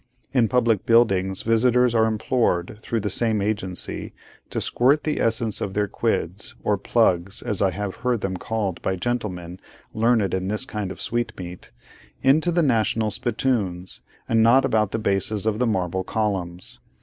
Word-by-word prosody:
In 120 -4 +3
public 115 -4 +1
buildings, 95 -5 +3
visitors 120 +2 +3
are 110 -1 +3
implored, 110 -4 0
through 115 -1 -2
the 105 - -2
same 110 +1 +1
agency, 100 -3 -2 0.4
to - - -3
squirt 135 +5 +2
the 155 - -1
essence 115 -1 +1
of 95 - -3
their 105 0 +1
quids, 100 -3 -2
or 105 - +2
'plugs,' 95 -3 +1
as 105 -6 -3
I 95 - +4
have 100 +1 -5
heard 120 -3 -1
them 95 -1 -2
called 100 -2 -3
by 95 - -1
gentlemen 90 -5 -4 0.3
learned 110 -4 +2
in 95 0 -1
this 105 +6 -1
kind 105 -6 -4
of - - -9
sweetmeat, 90 -7 -4 0.5
into 155 +6 +4
the 170 0 +2
national 110 -4 +1
spittoons, 105 -7 -2 0.3
and 115 0 +3
not 125 +4 +5
about 110 -5 +1
the 115 - -2
bases 105 0 0
of 110 -1 0
the 125 - +2
marble 95 -3 -1
columns. 95 -5 -3
110 Hz, 160 wpm, -23 LUFS, 95-120 Hz, 0.5 s, not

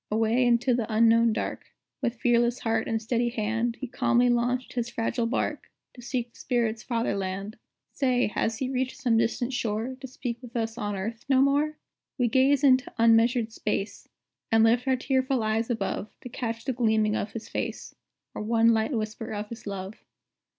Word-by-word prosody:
Away, 225 +3 +2
into 240 +1 +3
the 235 -2 -1
unknown 230 +1 +5
dark, 215 - -4 0.3
With 245 -2 -1
fearless 240 0 +2
heart 225 -1 -1
and 225 - 0
steady 240 +2 0
hand, 230 +1 -1
He 265 - -4
calmly 245 0 +2
launched 245 +1 0
his 240 -1 -2
fragile 230 0 -1
bark, 255 - -2 0.2
To 245 - -12
seek 240 -1 -3
the - - -18
spirits' 230 -3 0
Father 230 -4 -1
Land. 195 +2 -4 0.4
Say, 255 -3 +1
has 220 +1 -1
he 260 - -2
reached 260 0 -2
some 250 -5 +1
distant 230 +3 0
shore. 230 +1 -2
To 265 - -6
speak 245 -1 -5
with 245 -2 -12
us 225 -1 -1
on 205 -3 -3
earth 220 +4 -5
no 265 -1 +5
more? 290 +3 +2 0.4
We 245 -3 +2
gaze 270 +3 +3
into 260 -2 +4
unmeasured 230 0 +4
space, 210 -2 -3 0.4
And 225 0 +5
lift 235 +3 +3
our 260 - +4
tearful 260 -1 0
eyes 220 +2 0
above, 210 -2 -2
To 250 - -8
catch 230 -1 -4
the 265 - 0
gleaming 220 -3 +2
of 210 - -3
his 230 - -6
face, - - -4 0.4
Or - - -5
one 230 +1 +3
light 220 +5 0
whisper 220 0 -3
of 210 0 -4
his 230 -2 -9
love. 195 0 -5
235 Hz, 185 wpm, -27 LUFS, 225-250 Hz, 0.4 s, unknown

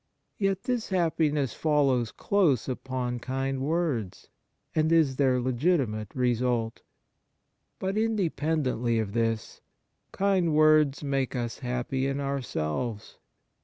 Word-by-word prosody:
Yet 195 -2 0
this 245 -3 -2
happiness 155 - +1
follows 140 -7 +1
close 170 - +1
upon 125 -1 -3
kind 135 +2 -2
words, 145 - -2 0.4
and 155 0 +2
is 155 -6 +3
their 130 -3 +3
legitimate 125 - 0
result. 120 -2 0 1.0
But, 195 +3 -1
independently 155 - 0
of 105 -3 -2
this, 115 -1 -1 0.5
kind 190 -5 +1
words 155 -2 +4
make 135 -2 -1
us 120 -3 -3
happy 125 +2 -2
in 135 +1 -2
ourselves. 120 - -3
135 Hz, 105 wpm, -27 LUFS, 120-160 Hz, 1.0 s, words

